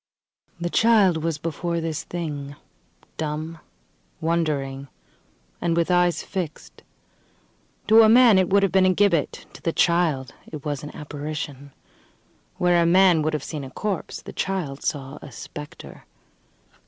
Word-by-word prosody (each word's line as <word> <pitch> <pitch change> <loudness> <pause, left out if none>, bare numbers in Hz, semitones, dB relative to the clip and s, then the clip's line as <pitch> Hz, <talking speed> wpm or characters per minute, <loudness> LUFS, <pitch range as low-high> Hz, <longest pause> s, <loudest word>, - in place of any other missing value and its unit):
The 175 0 -3
child 210 -7 +4
was 165 -2 -1
before 170 +2 -3
this 165 -2 -3
thing, 145 -5 -5 0.6
dumb, 155 +1 -4 0.6
wondering, 145 -5 -1 0.7
and 170 -1 0
with 170 +1 +1
eyes 175 -2 +2
fixed. 175 -5 -6 1.0
To 220 +2 +7
a 220 - +6
man 230 -4 +7
it 185 - +1
would 200 +1 +4
have 195 - +2
been 190 0 +4
a 185 - +4
gibbet; 175 -8 +1
to - - -13
the 165 - 0
child 160 -7 +1 0.2
it 150 -3 -8
was 145 -2 -2
an 150 - -7
apparition. 145 -1 -6 0.9
Where 175 -1 +3
a - - +3
man 180 -2 +5
would 155 +1 -1
have 150 -2 -2
seen 150 -3 -5
a 135 - -7
corpse 200 +8 -4
the - - -9
child 175 -8 -3
saw 135 -1 -3
a 145 - -10
spectre. 150 +5 -10
165 Hz, 145 wpm, -24 LUFS, 150-180 Hz, 1.0 s, To